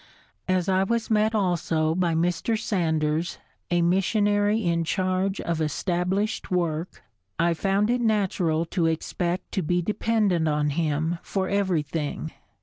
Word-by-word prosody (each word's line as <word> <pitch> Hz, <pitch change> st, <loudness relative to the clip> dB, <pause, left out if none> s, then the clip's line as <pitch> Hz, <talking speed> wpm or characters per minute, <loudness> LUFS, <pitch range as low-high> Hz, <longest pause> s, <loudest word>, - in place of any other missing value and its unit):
As 185 Hz, -1 st, +1 dB
I 190 Hz, 0 st, +3 dB
was 230 Hz, +3 st, -1 dB
met 215 Hz, +1 st, +3 dB
also 165 Hz, -5 st, +1 dB
by 170 Hz, -1 st, +1 dB
Mr. 175 Hz, +7 st, 0 dB
Sanders, 160 Hz, -5 st, 0 dB, 0.3 s
a 175 Hz, -1 st, +2 dB
missionary 205 Hz, +4 st, +2 dB
in 170 Hz, -1 st, +1 dB
charge 185 Hz, +2 st, 0 dB
of 165 Hz, -1 st, -2 dB
established 180 Hz, +6 st, -1 dB
work, 170 Hz, -2 st, -2 dB, 0.3 s
I 170 Hz, +1 st, +2 dB
found 195 Hz, +5 st, +1 dB
it 245 Hz, 0 st, +1 dB
natural 185 Hz, -7 st, +1 dB
to 170 Hz, 0 st, 0 dB
expect 170 Hz, +2 st, -2 dB
to 195 Hz, -, -1 dB
be 175 Hz, +2 st, +1 dB
dependent 210 Hz, -4 st, +1 dB
on 150 Hz, -1 st, +1 dB
him 160 Hz, +2 st, -1 dB
for 190 Hz, -1 st, -2 dB
everything. 160 Hz, -6 st, -1 dB
180 Hz, 135 wpm, -25 LUFS, 165-200 Hz, 0.3 s, I